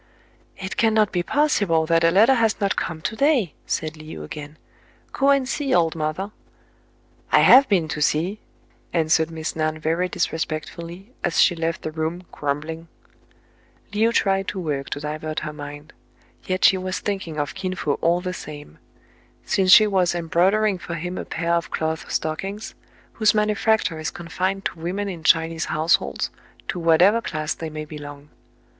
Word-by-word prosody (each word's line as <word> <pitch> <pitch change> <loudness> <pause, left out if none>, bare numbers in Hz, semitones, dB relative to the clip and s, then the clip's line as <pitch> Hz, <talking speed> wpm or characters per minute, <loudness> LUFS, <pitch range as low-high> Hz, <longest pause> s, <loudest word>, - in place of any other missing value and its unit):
" - - -34
It 190 0 -6
cannot 220 -2 +3
be 175 - 0
possible 200 - +2
that 165 0 +2
a 165 - +6
letter 215 +9 +5
has 225 -4 +1
not 200 -1 +1
come 160 -1 -3
to 220 - -3
day," 260 - +2
said 155 -1 -2
Le 155 0 -9
ou 75 - -7
again. 150 - -8 0.6
"Go 275 0 +2
and 275 -2 +3
see, 275 -2 0
old 165 -2 +2
mother." 160 +6 -3 1.0
"I - - +6
have 270 +1 +7
been 180 -6 +2
to 150 - -3
see," 170 +8 +1 0.5
answered 160 -1 +2
Miss 160 -1 -5
Nan 155 0 -1
very 165 +4 0
disrespectfully, 170 +6 -4
as 165 - 0
she 175 - +5
left 165 0 -2
the 155 - -3
room, 160 +3 -3
grumbling, 155 +3 -4 1.1
Le 215 +2 +3
ou - - +1
tried 195 -3 +1
to 195 - -3
work 145 -5 -3
to - - -3
divert 155 +1 -4
her 150 -1 -5
mind: 145 +1 -9 0.5
yet 185 0 +1
she 190 - +5
was 185 0 -3
thinking 190 -6 -4
of 145 -2 -2
Kin 185 -1 -4
Fo 145 -5 -1
all 170 +2 +2
the 180 0 -3
same; 145 - -10 0.7
since 190 -1 +2
she 215 - +9
was 185 -4 +1
embroidering 185 +4 +2
for 170 0 -6
him 180 +2 -4
a - - -5
pair 170 +1 -2
of 170 -1 0
cloth 160 0 -3
stockings, 195 +7 -3 0.4
whose 215 -1 +3
manufacture 210 -4 +1
is 155 - -2
confined 185 +3 -3
to 165 - -3
women 185 +5 -3
in 175 -5 -6
Chinese 165 0 +2
households, 160 +2 0 0.4
to 180 - -3
whatever 175 +7 +4
class 155 -7 -3
they 160 - -6
may 155 0 -6
belong. 145 -1 -10
170 Hz, 175 wpm, -23 LUFS, 155-195 Hz, 1.1 s, she